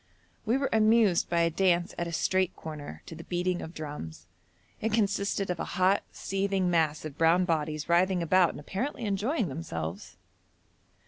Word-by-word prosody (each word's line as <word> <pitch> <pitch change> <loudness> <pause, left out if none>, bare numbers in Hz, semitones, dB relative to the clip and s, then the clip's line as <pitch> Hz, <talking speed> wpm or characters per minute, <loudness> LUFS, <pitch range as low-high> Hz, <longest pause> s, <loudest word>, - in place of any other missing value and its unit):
We 235 +4 +3
were 275 0 -1
amused 220 -4 +4
by 170 -1 +2
a 165 0 +2
dance 175 0 +2
at 170 - -3
a - - -5
street 185 +3 +1
corner 145 - -8
to - - -9
the 165 +1 -9
beating 180 0 -1
of 160 - -8
drums. 145 - -7 0.6
It 225 - 0
consisted 200 -2 0
of 175 - -4
a - - -1
hot, 185 +2 +4
seething 195 -2 -1
mass 155 -3 +1
of 150 -1 -8
brown 165 +3 +4
bodies 155 -3 -1
writhing 180 +1 +3
about 180 +1 +4
and - - -8
apparently 235 - -4
enjoying 210 - 0
themselves. 95 - -6
175 Hz, 170 wpm, -29 LUFS, 160-195 Hz, 0.6 s, amused